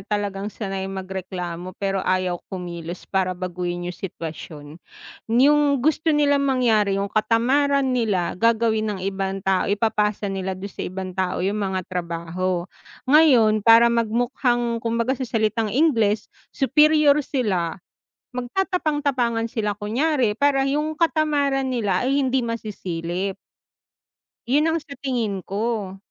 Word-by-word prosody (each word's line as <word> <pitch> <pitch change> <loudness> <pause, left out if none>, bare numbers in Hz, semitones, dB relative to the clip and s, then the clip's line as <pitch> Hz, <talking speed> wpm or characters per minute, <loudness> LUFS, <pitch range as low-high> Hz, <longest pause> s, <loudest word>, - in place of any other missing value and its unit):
talagang 205 -1 -3
sanay 195 -3 -4
magreklamo 185 -2 -6
pero 195 -1 -1
ayaw 185 -2 0
kumilos 175 -2 -6
para 185 -2 -1
baguhin 175 -1 -4
'yung 180 - -4
sitwasyon. 160 -4 -7 0.6
'Yung 280 +2 +3
gusto 310 +1 +1
nilang 285 -1 +3
mangyari 220 -6 +2
'yung 200 0 -3
katamaran 260 +5 +2
nila, 210 -8 0
gagawin 225 -1 +2
ng - - -8
ibang 195 0 -3
tao, 190 -1 +1
ipapasa 210 0 0
nila 190 -1 -3
do'n 195 +1 -8
sa - - -9
ibang 185 0 -5
tao 185 0 -1
'yung 205 +2 -1
mga 190 -2 -2
trabaho. 175 +1 -2 0.4
Ngayon, 255 -7 +5
para 230 +2 +6
magmukhang 235 +1 0
kumbaga 230 +2 0
sa 260 -2 -4
salitang 220 0 0
Ingles, 225 -5 +2 0.3
superior 300 +1 +4
sila, 205 - -1 0.6
magtatapang-tapangan 275 - -1
sila 210 -3 -1
kunyari 245 +3 +1
para 275 +3 +2
'yung 300 +3 -1
katamaran 295 -5 +1
nila 205 -7 0
ay 275 +1 +2
hindi 260 0 +1
masisilip. 190 -5 -4 1.1
'Yun 295 +6 +3
ang 325 - +1
sa 290 -2 -11
tingin 230 -8 -2
ko. 205 -1 -3
220 Hz, 125 wpm, -23 LUFS, 190-265 Hz, 1.1 s, para